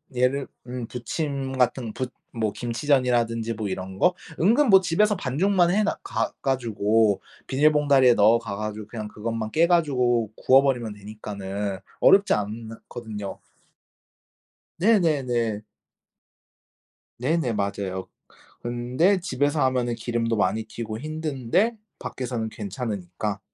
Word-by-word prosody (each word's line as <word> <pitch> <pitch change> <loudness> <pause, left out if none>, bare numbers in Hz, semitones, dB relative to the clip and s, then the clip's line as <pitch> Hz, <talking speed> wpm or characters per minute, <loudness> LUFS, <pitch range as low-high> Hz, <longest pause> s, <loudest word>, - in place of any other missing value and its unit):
얘를 130 +2 +1 0.2
음 125 -2 -5
부침 135 +2 -3
같은 125 -2 +1
부 130 -1 -3 0.3
뭐 110 -2 0
김치전이라든지 120 -2 0
뭐 105 -1 -4
이런 95 0 -5
거. 180 - +4 0.3
은근 235 - +4
뭐 195 -1 +8
집에서 205 +4 +2
반죽만 175 +5 +2
해 215 +3 +2
놔 210 - 0
가 115 - -2
가지고 110 -5 +1 0.3
비닐 150 +3 +4
봉다리에 140 -4 +5
넣어가 110 -1 +3
가지고 105 0 -5
그냥 110 -1 -6
그것만 110 +1 -4
깨 165 +2 +4
가지고 125 - +2
구워버리면 130 -5 +3
되니까는 100 -1 -5 0.2
어렵지 195 +1 +6
않거든요. 110 -1 -5 1.4
네네네. 135 - +2 1.5
네네 140 0 0
맞아요. 100 -2 -3 0.5
근데 125 +11 +1
집에서 145 -2 0
하면은 125 -2 0
기름도 115 0 -1
많이 105 +2 +1
튀고 110 0 -6
힘든데 155 - -1 0.2
밖에서는 120 -3 -4
괜찮으니까. 105 -2 -4
120 Hz, 275 characters per minute, -25 LUFS, 110-145 Hz, 1.5 s, 뭐